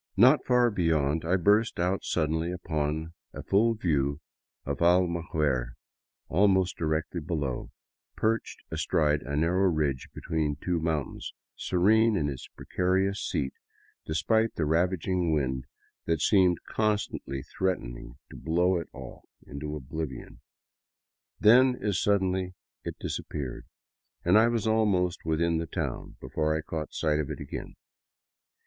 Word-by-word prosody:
Not 130 +8 +6
far 125 -1 +4
beyond, 80 -5 +1
I 90 +3 +2
burst 105 +5 +3
out 90 +2 0
suddenly 80 +1 0
upon 80 -2 -2 0.2
a - - -6
full 115 +4 +3
view 70 -8 0 0.5
of 70 0 -3
Almaguer, 80 -8 +1 0.5
almost 95 +1 +3
directly 80 +2 -2
below, 75 -5 -3 0.5
perched 115 +1 -1
astride 75 -2 +1
a 70 0 -4
narrow 90 +5 +2
ridge 75 -6 -1
between 75 -2 -2
two 85 +4 -1
mountains, 80 -4 -3 0.2
serene 110 +4 +3
in 75 -4 0
its 65 -3 -7
precarious 95 +2 -1
seat 65 - -2 0.5
despite 110 +9 +1
the 80 - 0
raging 90 +1 +1
wind 65 -3 -1 0.4
that 80 -1 0
seemed 90 -2 +3
constantly 105 -10 -1
threatening 65 -10 -3
to - - -10
blow 90 +3 +1
it - - -7
off - - -10 0.2
into 75 +2 -6
oblivion. 75 -1 -6 1.0
Then, 125 +4 +6
as 100 -4 0
suddenly, 95 -2 +1 0.3
it - - -5
disappeared, 70 -5 -5 0.6
and 90 +3 +4
I 110 +2 +6
was 115 -2 0
almost 100 -7 +1
within 80 +1 +1
the 85 - -3
town - - -4
before 75 +4 -1
I - - -3
caught 75 0 -5
sight 75 -1 0
of 75 - -2
it - - -5
again. - - -7
85 Hz, 130 wpm, -28 LUFS, 75-95 Hz, 1.0 s, Not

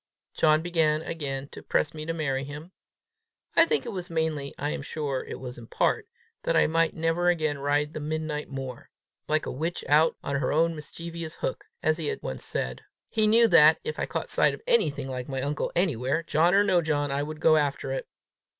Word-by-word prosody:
John 155 0 +3
began 160 -3 +1
again 140 -5 -4
to - - -10
press 155 - 0
me 155 0 -7
to - - 0
marry 135 -5 -1
him. 150 +5 -8 0.8
I 330 - +6
think - - +1
it 235 - -4
was 185 -3 -5
mainly, 160 -4 -1
I 145 +2 -2
am - - -3
sure 140 -2 -3
it - - -7
was 125 -1 -7
in 115 - -11
part, 440 - 0 0.3
that - - 0
I - - +5
might 165 +1 +1
never 165 +2 +1
again 155 -4 0
ride 145 +2 0
the - - -4
midnight 155 0 -3
moor 135 -3 -7 0.4
"like 155 0 +1
a - - -3
witch 165 +6 -3
out 155 +2 +4
on 140 - -1
her 135 -2 0
own 165 +2 +2
mischievous 165 +2 -7
hook," - - -4 0.2
as 155 +1 +2
he 155 - -2
had - - -3
once 65 - -3
said. 65 0 -3 0.3
He 220 -1 +2
knew 230 +2 +6
that, 155 +1 +7
if 155 - -4
I - - -1
caught - - -4
sight - - +4
of - - -17
anything 145 - +2
like 130 -1 -5
my 135 -1 -2
uncle 145 +1 -2
anywhere, 155 -3 +1
John 165 +3 +3
or 200 - +6
no 185 -4 +3
John, 145 -3 0
I 140 +1 0
would 155 +1 -5
go 160 0 +5
after 140 -2 -1
it. 135 - -3
155 Hz, 215 wpm, -27 LUFS, 140-165 Hz, 0.8 s, that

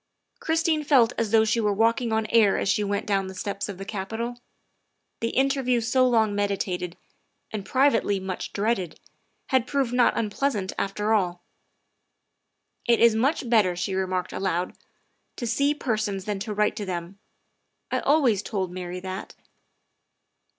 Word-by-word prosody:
Christine 320 -5 +1
felt 255 -5 +4
as 230 -2 -1
though 220 0 +4
she 230 +2 +1
were 210 -2 +2
walking 230 +3 +1
on 220 0 +1
air 220 -4 +5
as - - -1
she 210 +1 +2
went 200 0 -2
down 195 -2 0
the 190 - -8
steps 200 +1 -4
of 195 - -6
the 195 - -7
Capitol. 225 +5 -4 0.8
The 230 - -1
interview 265 -1 +1
so 255 +3 +2
long 220 -3 +3
meditated, 190 -3 -2 0.5
and 215 -2 -4
privately 255 -7 +2
much 190 -1 -5
dreaded, 200 -5 -1 0.5
had 260 -2 +2
proved 270 -4 0
not 245 -1 +3
unpleasant, 210 -2 -1
after 210 +2 0
all. 180 -4 0 1.4
"It 235 -1 +4
is 235 -1 +6
much 255 +4 +1
better," 210 -6 +3
she 180 +2 -2
remarked 185 -1 -2
aloud, 185 -2 -2 0.3
" - - -47
to 240 - -3
see 280 +6 +1
persons 215 -8 -2
than 205 -2 -2
to 210 +2 -4
write 210 0 +1
to 205 - -3
them; 180 +1 -5 0.7
I - - +1
always 265 -9 +3
told 195 -4 -3
Mary 180 0 -6
that. 185 0 -6
215 Hz, 155 wpm, -25 LUFS, 195-240 Hz, 1.4 s, is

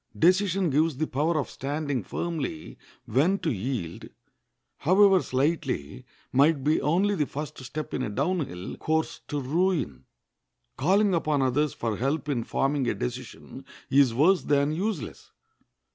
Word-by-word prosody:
Decision 185 0 +3
gives 155 0 +2
the 155 - 0
power 155 +4 0
of 145 - -1
standing 145 -1 -3
firmly 150 - -4 0.3
when 150 - +2
to 165 - -1
yield, 105 -6 -4 0.7
however 190 +3 +5
slightly, 135 - -2 0.2
might 140 +1 +3
be 150 +2 +2
only 185 +8 +2
the 150 -7 0
first 150 +1 -6
step 150 +4 -6
in - - -1
a 130 - -2
down 150 - 0
hill 90 +1 -7
course 160 0 -1
to 145 - -2
ruin. 150 - -1 0.7
Calling 195 +8 +3
upon 155 -4 +1
others 140 +3 +1
for 115 -3 -2
help 145 +4 -1
in 125 -5 0
forming 135 +2 0
a - - -1
decision - - -6 0.3
is 135 -2 +5
worse 165 +11 +4
than 145 0 +2
useless. 175 - -4
150 Hz, 145 wpm, -26 LUFS, 130-170 Hz, 0.7 s, however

